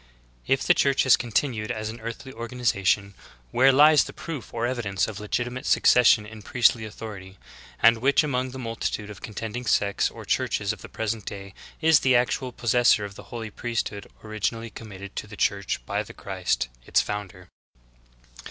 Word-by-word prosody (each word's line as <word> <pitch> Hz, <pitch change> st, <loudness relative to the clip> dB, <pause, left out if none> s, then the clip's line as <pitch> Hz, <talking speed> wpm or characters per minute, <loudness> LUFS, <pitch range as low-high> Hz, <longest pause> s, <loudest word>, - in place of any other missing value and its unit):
If 135 Hz, 0 st, +2 dB
the 175 Hz, -, +5 dB
Church 140 Hz, -5 st, +2 dB
has 130 Hz, -, +7 dB
continued 115 Hz, -2 st, -1 dB
as 110 Hz, 0 st, -3 dB
an 115 Hz, +2 st, -8 dB
earthly 115 Hz, +3 st, -7 dB
organiza 115 Hz, -3 st, -2 dB
tion, 100 Hz, +2 st, +2 dB, 0.4 s
where 135 Hz, +2 st, +5 dB
lies 150 Hz, +3 st, +6 dB
the -, -, -9 dB
proof 160 Hz, -6 st, -7 dB
or 115 Hz, 0 st, -2 dB
evidence 115 Hz, -7 st, -1 dB
of 105 Hz, -2 st, -6 dB
legitimat:e 120 Hz, +4 st, -3 dB
succes 125 Hz, -1 st, +5 dB
sion 105 Hz, -2 st, +5 dB
in 110 Hz, 0 st, -11 dB
priestly 115 Hz, 0 st, +2 dB
authority, 100 Hz, -3 st, -9 dB, 0.4 s
and 115 Hz, 0 st, +5 dB
which 140 Hz, +4 st, +3 dB
among 130 Hz, -3 st, -1 dB
the 130 Hz, -, -8 dB
multitude 115 Hz, -3 st, -4 dB
of 100 Hz, -, -12 dB
contending 115 Hz, +2 st, -6 dB
sects 100 Hz, -1 st, +2 dB
or -, -, -11 dB
churches -, -, 0 dB
of -, -, -12 dB
the -, -, -10 dB
present 110 Hz, -1 st, -3 dB
day 100 Hz, -1 st, -7 dB, 0.3 s
is 160 Hz, -2 st, +6 dB
the 130 Hz, -1 st, +3 dB
actual 125 Hz, +1 st, +1 dB
possessor 120 Hz, -3 st, +3 dB
of 100 Hz, -, -8 dB
the -, -, -12 dB
holy 115 Hz, -3 st, -6 dB
priesthood 110 Hz, -3 st, -3 dB, 0.2 s
originally 110 Hz, +1 st, -3 dB
committed 100 Hz, -3 st, -10 dB
to -, -, -4 dB
the -, -, -11 dB
Church -, -, -1 dB
by -, -, -1 dB
the -, -, -10 dB
Christ, 65 Hz, -, -2 dB, 0.2 s
its -, -, +2 dB
founder? 95 Hz, -3 st, -5 dB
115 Hz, 180 wpm, -25 LUFS, 105-125 Hz, 0.4 s, has